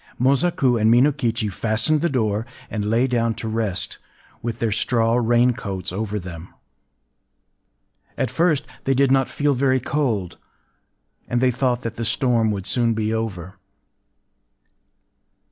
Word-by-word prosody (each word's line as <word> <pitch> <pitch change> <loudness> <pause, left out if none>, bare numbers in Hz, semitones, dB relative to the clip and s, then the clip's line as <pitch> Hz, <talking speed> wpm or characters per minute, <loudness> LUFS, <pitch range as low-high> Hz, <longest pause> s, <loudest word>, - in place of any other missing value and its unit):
Mosaku 130 -2 +2
and 110 - +4
Minokichi 120 -3 +2
fastened 115 - 0
the 170 - +1
door, 110 -4 -1 0.2
and 105 -1 -2
lay 115 +3 +3
down 115 -3 0
to 115 - -6
rest, 110 -4 -3 0.4
with 115 -1 -3
their 115 -2 -1
straw 115 +1 +1
rain 120 +1 +3
coats 95 -8 -5
over 105 +2 -3
them. 85 -3 -8 1.7
At 130 -3 -1
first 160 +1 +1 0.2
they 135 - +2
did 135 0 +3
not 135 -1 +3
feel 145 0 +1
very 130 0 +2
cold; 120 - -2 0.9
and 120 - 0
they 130 0 +3
thought 125 0 0
that 115 - -5
the 115 - -2
storm 115 -1 +1
would 100 -3 -3
soon 115 0 +2
be 110 0 -1
over. 95 -5 -4
115 Hz, 140 wpm, -22 LUFS, 110-130 Hz, 1.7 s, and